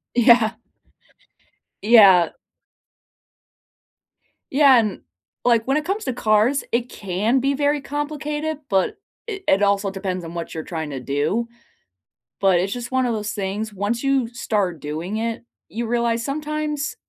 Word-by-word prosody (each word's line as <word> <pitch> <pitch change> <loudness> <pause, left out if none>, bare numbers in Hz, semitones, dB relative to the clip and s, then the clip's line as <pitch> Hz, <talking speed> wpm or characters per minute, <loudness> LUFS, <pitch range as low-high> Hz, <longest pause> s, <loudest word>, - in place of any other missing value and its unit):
Yeah. 235 -2 +5 1.3
Yeah. 200 -6 +7 2.2
Yeah, 275 -2 +6
and, 215 -4 -1 0.4
like, 230 -2 +3
when 270 +2 +1
it 305 - 0
comes 395 +6 -2
to 260 - -1
cars, 225 +4 +2
it 240 +1 0
can 205 +7 0
be 275 +2 +1
very 290 +1 +1
complicated, 295 +1 -3
but 190 -2 +1 0.3
it 405 -4 -6
it 195 +2 +4
also 200 0 +2
depends 190 -2 -4
on 165 +1 -8
what 170 -1 -5
you're 160 - -4
trying 160 -3 -5
to 135 -2 -5
do, 150 - -1 0.9
but 190 -3 +4
it's 195 +3 -1
just 245 0 -6
one 260 0 +1
of 240 - 0
those 210 0 -3
things. 205 +2 -4
Once 205 +5 -2
you 275 -3 +2
start 205 -8 -2
doing 160 +8 -4
it, 230 +1 -3 0.3
you 235 0 -4
realize 235 -1 0
sometimes 300 +1 -3
230 Hz, 145 wpm, -22 LUFS, 195-275 Hz, 2.2 s, Yeah